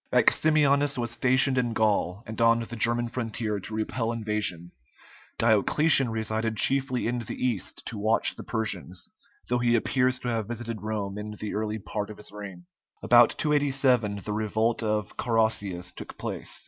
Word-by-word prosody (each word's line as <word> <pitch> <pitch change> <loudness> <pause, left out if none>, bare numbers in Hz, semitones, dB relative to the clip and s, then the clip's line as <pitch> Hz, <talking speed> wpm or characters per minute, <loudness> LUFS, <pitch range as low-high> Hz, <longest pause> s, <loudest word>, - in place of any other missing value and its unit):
Maximianus 145 -2 +3
was 120 -1 -2
stationed 130 +2 +3
in 120 -2 -1
Gaul 105 -2 0
and 110 +1 -5
on 115 0 +4
the 115 +1 -6
German 120 +1 +1
frontier 115 -3 -3
to 105 +3 -8
repel 115 +1 -2
invasion; 105 -7 -2 0.7
Diocletian 125 +5 +4
resided 110 0 -2
chiefly 135 +1 +1
in 120 +1 -1
the 115 - -5
East 115 -7 -3
to 110 - -5
watch 110 +2 +3
the - - -9
Persians, 95 -5 -4 0.4
though 125 0 0
he 120 0 +2
appears 125 +2 +2
to 125 - -6
have 115 -3 -1
visited 115 -2 -5
Rome 105 -2 -4
in 105 0 -6
the 105 - -4
early 110 0 -2
part 105 0 -5
of 105 - -9
his 105 - -6
reign. 100 -4 -9 0.4
About - - +6
287 135 -8 +1
the 105 - -3
revolt 110 +2 0
of 105 -3 -2
Carausius 110 -6 0
took - - -10
place. - - -4
115 Hz, 160 wpm, -26 LUFS, 105-120 Hz, 0.7 s, About